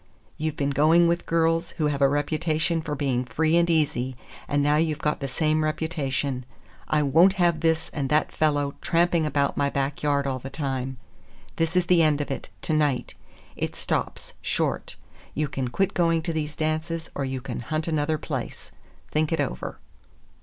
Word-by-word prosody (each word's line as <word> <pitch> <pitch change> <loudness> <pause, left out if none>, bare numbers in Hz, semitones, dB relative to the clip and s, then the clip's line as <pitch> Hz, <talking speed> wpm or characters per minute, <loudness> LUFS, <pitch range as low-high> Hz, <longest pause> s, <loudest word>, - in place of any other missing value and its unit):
You've 155 -1 -2
been 140 0 0
going 160 +5 +5
with 170 +1 0
girls 165 0 +1
who 155 - +1
have 145 -1 0
a 140 - +6
reputation 155 +3 0
for 150 -1 -3
being 135 -3 0
free 155 +7 +1
and 170 0 +3
easy, 140 -6 +1 0.3
and 145 0 +1
now 145 +1 +3
you've 155 -1 +1
got 150 0 -1
the 140 - -3
same 155 +3 +1
reputation. 145 -4 -1 0.4
I 150 -1 +2
won't 165 +7 +5
have 175 -4 +2
this 160 0 +1
and 140 -3 -2
that 150 +2 +2
fellow 145 -2 +1
tramping 170 -1 +2
about 140 -1 0
my 140 0 +2
back 140 0 -2
yard 145 -1 +1
all 130 -1 -1
the 135 - -7
time. 135 -3 -3 0.6
This 165 +2 0
is 180 -1 +3
the 175 -1 +4
end 155 -2 +3
of 145 - -3
it, 135 - -5
to 160 - 0
night. 145 -4 +1 0.4
It - - -3
stops, - - -3
short. - - -1 0.4
You 150 0 0
can 135 -2 -3
quit 195 +10 0
going 165 -2 +2
to 165 - -2
these 150 -1 -3
dances, 160 +1 -2
or 140 - -2
you 130 -1 -2
can 125 -1 -5
hunt 155 +7 -3
another 155 -1 +1
place. - - -5 0.4
Think 155 +1 +1
it 165 - 0
over." 145 - -3
155 Hz, 185 wpm, -25 LUFS, 140-165 Hz, 0.6 s, a